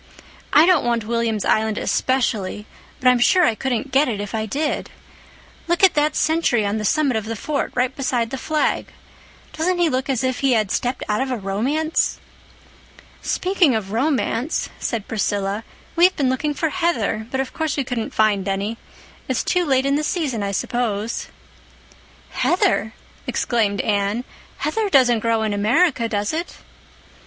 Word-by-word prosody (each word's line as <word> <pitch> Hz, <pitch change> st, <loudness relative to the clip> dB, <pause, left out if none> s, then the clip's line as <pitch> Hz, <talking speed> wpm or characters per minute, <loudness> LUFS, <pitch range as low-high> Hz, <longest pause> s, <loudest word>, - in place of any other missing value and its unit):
"I 305 Hz, -, +7 dB
don't 360 Hz, -4 st, +4 dB
want 235 Hz, -2 st, 0 dB
William's 230 Hz, -2 st, -1 dB
Island 220 Hz, -1 st, +1 dB
especially, 220 Hz, -6 st, -1 dB, 0.3 s
but 255 Hz, -, +1 dB
I'm 250 Hz, -1 st, +5 dB
sure 360 Hz, +9 st, +4 dB
I 230 Hz, -, +3 dB
couldn't 255 Hz, +2 st, -3 dB
get 275 Hz, +3 st, +4 dB
it 220 Hz, -5 st, -2 dB
if 205 Hz, -1 st, -5 dB
I 220 Hz, -1 st, -2 dB
did. 295 Hz, +7 st, -2 dB, 0.8 s
Look 345 Hz, +2 st, 0 dB
at 380 Hz, -, +7 dB
that 300 Hz, 0 st, +1 dB
sentry 310 Hz, -9 st, +2 dB
on 205 Hz, +2 st, -1 dB
the 215 Hz, -, -3 dB
summit 285 Hz, +2 st, +2 dB
of 220 Hz, -, -3 dB
the 225 Hz, +1 st, -4 dB
fort, 285 Hz, +6 st, -2 dB
right 255 Hz, +1 st, 0 dB
beside 250 Hz, -4 st, -1 dB
the 270 Hz, -, -3 dB
flag. 310 Hz, +1 st, 0 dB, 0.7 s
Doesn't 355 Hz, +3 st, 0 dB
he 345 Hz, -2 st, +3 dB
look 260 Hz, +2 st, -1 dB
as 265 Hz, -2 st, 0 dB
if 260 Hz, -1 st, -1 dB
he 275 Hz, -2 st, +2 dB
had 215 Hz, -4 st, +1 dB
stepped 250 Hz, +1 st, -1 dB
out 210 Hz, +3 st, 0 dB
of 265 Hz, -, -1 dB
a 250 Hz, -, -1 dB
romance?" 250 Hz, +11 st, -1 dB, 1.0 s
"Speaking 365 Hz, -, +2 dB
of 200 Hz, -3 st, -3 dB
romance," 255 Hz, +2 st, 0 dB
said 225 Hz, -4 st, -3 dB
Priscilla, 205 Hz, -1 st, -1 dB, 0.3 s
"we've 355 Hz, +2 st, +5 dB
been 265 Hz, -3 st, +1 dB
looking 290 Hz, +3 st, -1 dB
for 320 Hz, -, 0 dB
heather—but, 265 Hz, -, -1 dB
of 265 Hz, -, -3 dB
course, 315 Hz, -3 st, -2 dB
we 280 Hz, -, +1 dB
couldn't 240 Hz, -3 st, -3 dB
find 205 Hz, -3 st, +1 dB
any. 200 Hz, +4 st, -2 dB, 0.5 s
It's -, -, 0 dB
too 360 Hz, -1 st, +1 dB
late 265 Hz, -2 st, +2 dB
in 280 Hz, +1 st, +2 dB
the 305 Hz, -, -1 dB
season, 295 Hz, -, -1 dB
I 200 Hz, 0 st, -2 dB
suppose." 220 Hz, +1 st, -2 dB, 1.0 s
"Heather!" 350 Hz, -, +1 dB, 0.3 s
exclaimed 215 Hz, -4 st, 0 dB
Anne. 205 Hz, +3 st, 0 dB, 0.3 s
"Heather 445 Hz, -2 st, -1 dB
doesn't 250 Hz, -, +4 dB
grow 225 Hz, 0 st, +1 dB
in 215 Hz, -1 st, -1 dB
America, 235 Hz, -, +2 dB
does 205 Hz, +3 st, -1 dB
it?" 335 Hz, +2 st, -4 dB
245 Hz, 165 wpm, -21 LUFS, 220-300 Hz, 1.0 s, I